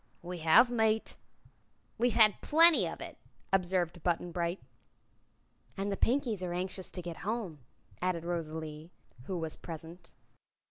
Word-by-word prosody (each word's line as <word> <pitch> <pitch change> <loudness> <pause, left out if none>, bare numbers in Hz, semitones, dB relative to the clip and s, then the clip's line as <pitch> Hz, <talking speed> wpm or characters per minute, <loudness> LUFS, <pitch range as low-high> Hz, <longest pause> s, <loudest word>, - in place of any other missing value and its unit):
"We 175 0 -6
have, 165 +10 +6
mate." 220 -2 +1 0.8
"We've 240 -1 +2
had 215 -3 +5
plenty 330 +2 +6
of - - -7
it," - - -8 0.3
observed 180 -2 0
Button 175 0 -1
Bright. 170 +2 -2 1.2
"And 200 +1 -2
the - - 0
Pinkies 235 -3 0
are 180 -1 -3
anxious 185 +1 -3
to 180 - -5
get 170 -1 -6
home," 205 -7 -4 0.4
added 175 -2 -1
Rosalie, 160 -2 -5 0.4
who 185 - -3
was 160 -2 -4
present. 165 +1 -10
180 Hz, 135 wpm, -31 LUFS, 170-210 Hz, 1.2 s, have